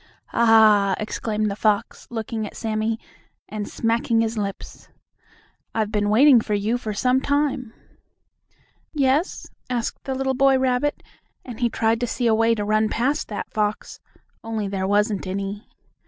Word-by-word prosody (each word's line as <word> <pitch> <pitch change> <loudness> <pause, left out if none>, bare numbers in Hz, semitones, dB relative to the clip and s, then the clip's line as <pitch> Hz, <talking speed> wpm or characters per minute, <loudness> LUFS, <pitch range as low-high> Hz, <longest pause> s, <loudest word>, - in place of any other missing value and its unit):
"Ah!" 215 -4 +5
exclaimed 215 0 -2
the - - -4
fox, 210 +1 -1
looking 220 -1 -4
at - - -12
Sammie, 220 0 -1 0.5
and 210 -1 -5
smacking 230 0 +1
his 225 0 -1
lips, 200 -2 -6 0.9
"I've 215 -2 0
been 205 -1 0
waiting 250 +3 +6
for 210 -1 -1
you 215 +4 0
for 220 -3 -4
some 250 +5 +1
time." 285 -4 0 1.2
"Yes?" 285 +4 +1 0.2
asked 240 -2 -3
the 265 -2 -2
little 265 0 0
boy 270 0 +4
rabbit, 260 +2 0 0.4
and 245 -4 -8
he 240 -1 +2
tried 225 0 +1
to 245 - -1
see 245 - -2
a 230 - +4
way 225 +1 +3
to 205 -2 -3
run 215 +1 +2
past 270 +8 0
that 210 - -6
fox, 210 0 -2 0.4
only 220 -2 -3
there 195 -1 -2
wasn't 205 -1 +1
any. 200 +2 -4
225 Hz, 155 wpm, -23 LUFS, 210-250 Hz, 1.2 s, waiting